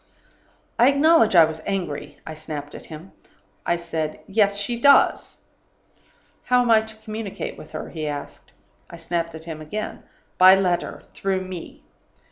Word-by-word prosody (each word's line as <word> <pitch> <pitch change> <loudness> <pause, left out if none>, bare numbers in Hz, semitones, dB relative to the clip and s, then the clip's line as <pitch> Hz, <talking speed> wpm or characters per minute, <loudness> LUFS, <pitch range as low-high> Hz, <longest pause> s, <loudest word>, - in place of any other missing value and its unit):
"I 240 - +7
acknowledge 280 - +4
I 165 -2 +9
was 160 0 -6
angry. 150 -7 -4
I 160 - -6
snapped 150 -2 -7
at - - -10
him. 160 +4 -10 0.6
I 175 - +3
said, 165 -2 -4
'Yes, 200 0 +2
she 205 +4 -2
does.' 280 +1 +4 1.0
"'How 250 0 +3
am 240 - +1
I 220 -1 +6
to 220 0 -8
communicate 215 -2 -6
with - - -12
her?' - - -6
he 155 -2 -4
asked. 145 -1 -7 0.4
"I 170 - -10
snapped 165 0 -3
at 160 - -10
him 160 -2 -7
again. 210 +8 -5 0.4
'By 185 +1 +9
letter 180 -3 -1
through 190 -1 -1
me. 185 -2 -9
185 Hz, 155 wpm, -23 LUFS, 160-215 Hz, 1.0 s, I